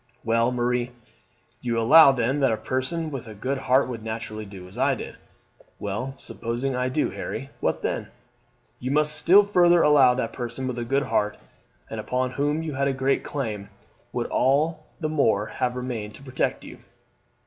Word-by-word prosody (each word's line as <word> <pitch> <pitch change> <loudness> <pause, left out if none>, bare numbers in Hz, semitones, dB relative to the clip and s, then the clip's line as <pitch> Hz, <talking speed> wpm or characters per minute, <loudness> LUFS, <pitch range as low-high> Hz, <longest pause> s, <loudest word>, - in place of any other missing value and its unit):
"Well, 115 +1 +2
Marie, 125 0 -1 0.7
you 120 -2 -1
allow 145 +6 +8
then 130 +2 0
that 135 -4 +3
a 110 - 0
person 145 +7 -3
with 130 -4 -6
a 110 - -9
good 130 +7 -2
heart 130 0 +3
would 120 -3 -6
naturally 110 -1 -5
do 95 -2 -10
as 90 - -13
I - - +2
did." - - -8 0.6
"Well, 105 +7 -4
supposing 120 +3 -3
I 125 0 0
do, 150 +4 0
Harry, 135 +5 -6
what - - -1
then?" - - -2 0.7
"You 130 - -4
must 150 +2 +2
still 195 +6 +6
further 175 -4 +4
allow 135 -4 +6
that 120 -3 -1
a - - -20
person 125 +1 -5
with 125 -1 -3
a 120 - -3
good 135 +3 +1
heart, 105 -5 0 0.5
and - - -6
upon 130 0 -1
whom 145 +4 -1
you 155 -2 -4
had 140 +1 0
a 135 - +1
great 135 +1 0
claim, 110 -8 -4 0.4
would - - -2
all 150 +5 +1
the 155 - -1
more 115 -9 +2
have 125 +2 -2
remained 120 -4 -5
to - - -14
protect 130 -1 -2
you." - - -11
130 Hz, 185 wpm, -25 LUFS, 115-140 Hz, 0.7 s, allow